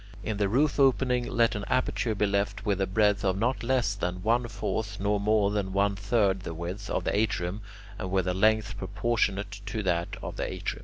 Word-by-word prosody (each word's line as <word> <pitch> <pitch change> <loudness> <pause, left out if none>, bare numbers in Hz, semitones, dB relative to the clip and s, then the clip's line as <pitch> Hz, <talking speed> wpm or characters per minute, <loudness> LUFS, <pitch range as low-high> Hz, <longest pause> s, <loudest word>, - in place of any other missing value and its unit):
In 110 -2 -2
the 100 -1 +1
roof 140 +7 +2
opening 125 -2 +3
let 120 -3 +2
an 105 -2 -4
aperture 125 -3 0
be 105 - +2
left 100 +1 -1
with 100 -2 0
a 95 - +1
breadth 105 +1 +2
of 95 -1 +1
not 115 +1 0
less 120 -3 +1
than 90 -2 -3
one 120 +2 +2
fourth 105 -3 -3
nor 100 +1 +1
more 105 0 +2
than 100 -2 -2
one 100 +1 +2
third 100 -1 +1
the 85 -3 -6
width 90 +5 -5
of - - -1
the - - 0
atrium, 100 -2 0 0.4
and 95 - -4
with 95 -1 +1
a 90 - +1
length 110 +2 +2
proportionate 100 -1 -1
to 110 +1 -3
that 85 -2 0
of - - -6
the - - -2
atrium. - - -4
105 Hz, 210 wpm, -28 LUFS, 95-110 Hz, 0.4 s, opening